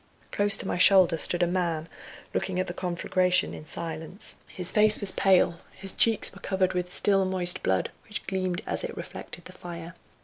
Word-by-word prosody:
Close 205 0 +3
to - - -4
my 180 - -2
shoulder 185 -2 +6
stood 175 +2 +1
a - - +4
man 170 -3 -2 0.5
looking 185 -1 -2
at 185 - 0
the 175 - -6
conflagration 180 +1 0
in - - -9
silence. 160 +4 -5
His 180 -1 -2
face 215 0 +4
was 200 -2 +2
pale, 185 -3 +2
his 195 0 -9
cheeks 225 -2 +4
were 195 - -14
covered 190 -1 -1
with 180 0 -3
still 195 0 +2
moist 185 -2 +1
blood, 95 -1 -1 0.2
which 210 - -6
gleamed 185 -1 -3
as - - -3
it - - -6
reflected 175 - -9
the 185 - -12
fire. 170 -2 -9
180 Hz, 190 wpm, -26 LUFS, 175-190 Hz, 0.5 s, shoulder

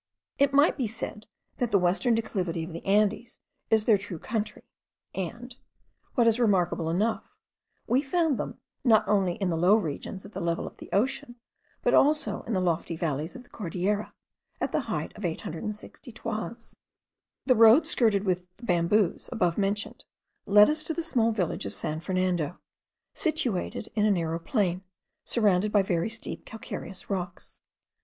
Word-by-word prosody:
It 280 0 +4
might 285 +3 +4
be 255 -5 0
said 215 -1 -6 0.3
that 245 - 0
the 205 - +4
western 190 +6 +2
declivity 185 -7 -2
of 165 +1 -7
the 165 - -7
Andes 210 +3 +1 0.3
is 220 -1 +4
their 215 -4 +5
true 195 -3 -6
country; 215 +4 -3 0.5
and, 235 +7 -5 0.6
what 240 - +4
is 230 +1 +3
remarkable 180 -7 +2
enough, 210 +7 -1 0.5
we 255 +3 +2
found 315 -1 +1
them - - -4 0.3
not 220 -3 +4
only 195 -4 +2
in 190 -3 -1
the - - 0
low 180 +5 +5
regions 190 0 -3
at 200 - -11
the - - -5
level 170 0 -1
of - - -9
the - - -11
ocean, 240 +3 0 0.5
but - - +3
also 300 +2 +3
in 230 - -2
the 190 - +2
lofty 170 -1 0
valleys 155 -1 -2
of 255 - -9
the - - -23
Cordilleras, 200 +2 -2 0.5
at - - -1
the - - +1
height - - -3
of 210 - -9
860 195 - -5
toises. 230 +1 -5 0.7
The 260 - +5
road 230 +7 +7
skirted 220 -9 +2
with 180 -2 -1
the 235 - -19
bamboos 175 +1 +2
above 180 -8 +1
mentioned 205 +1 -2 0.4
led 210 +1 +8
us 305 +1 +1
to 320 - -2
the 335 - -2
small 240 -8 +2
village 185 - -2
of 100 - -6
San 155 +1 -3
Fernando, 180 -2 -1 0.6
situated 310 - -1
in 215 -1 +2
a - - +3
narrow 165 -4 0
plain, 185 -1 0 0.4
surrounded 210 -3 +2
by 205 -2 +4
very 175 +1 0
steep 225 0 -5
calcareous 210 -3 -7
rocks. 180 -2 -4
210 Hz, 165 wpm, -27 LUFS, 180-230 Hz, 0.7 s, led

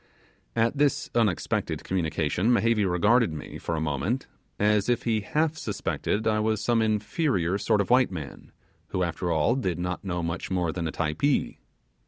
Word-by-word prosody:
At 115 +4 +1
this 145 0 +1
unexpected 110 -7 0
communication 90 +3 0
Mehevi 115 -3 +3
regarded 105 +4 +3
me, 75 -1 -7
for 85 - -3
a - - -1
moment, 80 - -1 0.3
as 105 +1 +2
if 120 - +1
he 110 -2 +1
half 155 +9 0
suspected 105 -1 -2
I 110 -1 +2
was 110 0 +1
some 120 0 +2
inferior 105 - 0
sort 105 +1 +2
of 100 - -3
white 125 0 +5
man, 80 -7 -8 0.4
who 90 - -1
after 85 +1 -2
all 80 +8 +2
did 95 -11 -1
not 90 0 -3
know 90 -3 -2
much 85 +1 -3
more 90 -3 0
than 85 0 -3
a - - -3
Typee. 90 - 0
105 Hz, 170 wpm, -26 LUFS, 85-115 Hz, 0.4 s, white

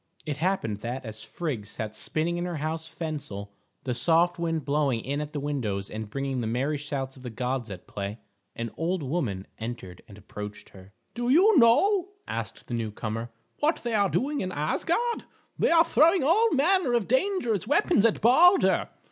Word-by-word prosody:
It 150 -3 -3
happened 160 - 0
that 120 +5 -5
as 110 -1 -6
Frigg 135 -12 -4
sat 110 0 -5
spinning 160 +9 -1
in 175 - -2
her 175 -1 -3
house 160 +2 -3
Fensal, 145 -12 -6 0.3
the 125 - -1
soft 170 +7 +2
wind 165 -3 -1
blowing 140 -5 +1
in 140 +5 -2
at 150 0 -5
the 150 - -3
windows 115 -9 -3
and 110 -1 -5
bringing 135 +1 -2
the 115 - -2
merry 135 +6 -1
shouts 140 -2 -4
of - - -13
the 125 - -6
gods 125 +1 -3
at 95 -3 -8
play, 100 +1 -5 0.4
an 115 -1 -4
old 170 0 -1
woman 130 - -2
entered 110 -6 -6
and 100 - -13
approached 105 +1 -8
her. 95 +1 -15 0.2
"Do 240 +1 -2
you 380 +10 +6
know," 380 - +4
asked - - -5
the - - -7
newcomer, 115 0 -3 0.3
"what 310 +3 +1
they 240 -1 -2
are 200 -2 +3
doing 290 +2 0
in 185 - -3
Asgard? 340 - -1 0.3
They - - +3
are 330 0 +6
throwing 330 +1 +4
all 415 +11 +4
manner 310 -1 +3
of 235 -5 +1
dangerous 255 - +1
weapons 290 - +3
at 230 -2 +2
Balder. 335 - +5
150 Hz, 180 wpm, -27 LUFS, -, 0.4 s, you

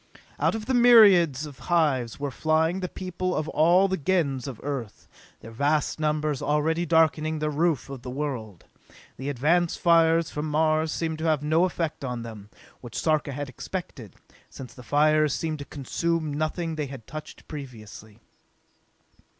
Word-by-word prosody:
Out - - +2
of 220 -1 -5
the 260 - -1
myriads 200 - +6
of 145 -4 -11
hives 140 -9 +1
were 145 -1 -3
flying 160 +5 +1
the 180 -1 -4
people 185 0 -3
of 155 - -2
all 175 +5 +4
the 190 0 -1
Gens 145 -6 0
of 130 -5 -7
Earth, 135 -7 -5 0.3
their 115 - -10
vast 145 +6 0
numbers 150 -2 -1
already 160 +3 0
darkening 160 -1 +2
the 150 0 -1
roof 155 -3 0
of 135 -3 -8
the 125 - -7
world. 125 - -5 0.5
The 135 +2 -4
advance 160 +6 +1
fires 165 -1 +3
from 150 +1 -3
Mars 155 +1 +1
seemed 160 -1 -3
to 160 - -3
have 155 -3 +1
no 160 +4 +3
effect 165 -5 -3
on 125 -3 -4
them, 105 -3 -10 0.3
which 120 -2 -9
Sarka 155 -2 0
had 145 +1 -5
expected, 130 - -7 0.3
since 130 -2 -10
the 125 - -12
fires 150 +2 +2
seemed 155 -2 -3
to 145 - -7
consume 155 +3 -2
nothing 155 +2 -2
they 150 -2 -2
had 130 -4 -10
touched 155 0 -10
previously. 110 -6 -10
155 Hz, 165 wpm, -26 LUFS, 135-165 Hz, 0.5 s, myriads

